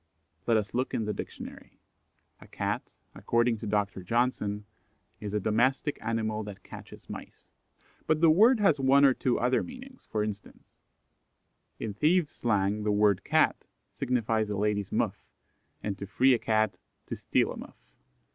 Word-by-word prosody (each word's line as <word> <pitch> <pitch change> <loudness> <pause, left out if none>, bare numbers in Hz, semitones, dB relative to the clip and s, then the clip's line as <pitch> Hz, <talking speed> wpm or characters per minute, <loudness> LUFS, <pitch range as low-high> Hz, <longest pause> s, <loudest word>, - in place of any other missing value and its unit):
Let 115 -2 +4
us 105 -2 -2
look 130 +2 -1
in 110 - -1
the 105 - -1
dictionary. - - -9 0.6
A - - -15
Cat, - - -2 0.3
according 115 -1 +1
to 110 - -5
Dr. 100 -2 -1
Johnson, 105 -1 -1 0.5
is 105 -1 -5
"a 105 - 0
domestick 125 +8 +1
animal 110 -1 -1
that 100 -2 -9
catches - - -12
mice." - - -10 0.6
But 155 0 +2
the 165 -1 +6
word 220 +9 +6
has 195 -9 +3
one 135 +1 +5
or 135 - +6
two 125 -1 0
other 125 +1 +2
meanings, 255 +1 -11
for 105 -1 0
instance: 105 -1 -8 1.0
In 110 - -4
thieves' 155 - +2
slang 105 -2 0
the 105 0 0
word 105 -2 +3
"Cat" - - +2 0.3
signifies 115 -3 0
a 105 - -2
lady's 105 -1 0
muff, - - -1 0.6
and 100 -2 -2
"to 100 - -6
free 130 +6 +4
a 120 - +2
cat" 110 -4 +1 0.3
to - - -5
steal - - +1
a - - -7
muff. - - -10
110 Hz, 160 wpm, -29 LUFS, 105-130 Hz, 1.0 s, the